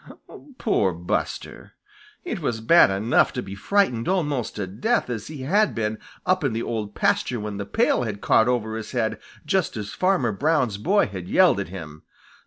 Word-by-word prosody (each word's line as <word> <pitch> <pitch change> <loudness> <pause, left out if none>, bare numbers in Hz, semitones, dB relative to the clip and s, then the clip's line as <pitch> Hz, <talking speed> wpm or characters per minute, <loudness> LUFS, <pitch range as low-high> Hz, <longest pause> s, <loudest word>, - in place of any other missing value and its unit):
Poor 100 - +1
Buster! 85 +1 -4 0.5
It - - -3
was 115 -2 -2
bad 145 +8 +6
enough 100 +5 +2
to 125 - -3
be 95 - -8
frightened 125 - +1
almost 150 - -1
to 105 - -3
death 125 - -1
as 115 -3 -5
he 150 -4 -7
had 205 +9 +2
been 110 -1 -2 0.3
up 185 -2 +2
in 135 -5 0
the 115 +1 -2
Old 105 -3 -4
Pasture 200 - +1
when 105 -1 -5
the 100 -1 -5
pail 225 - +2
had 110 -4 -3
caught 110 - +3
over 110 -3 0
his 110 +1 -6
head 115 -3 -1 0.3
just 175 -5 0
as 105 -1 -5
Farmer 180 - +1
Brown's 130 -3 0
boy 200 - +3
had 95 -3 -7
yelled - - +4
at - - -3
him. 80 -4 -9
115 Hz, 185 wpm, -24 LUFS, 105-160 Hz, 0.5 s, bad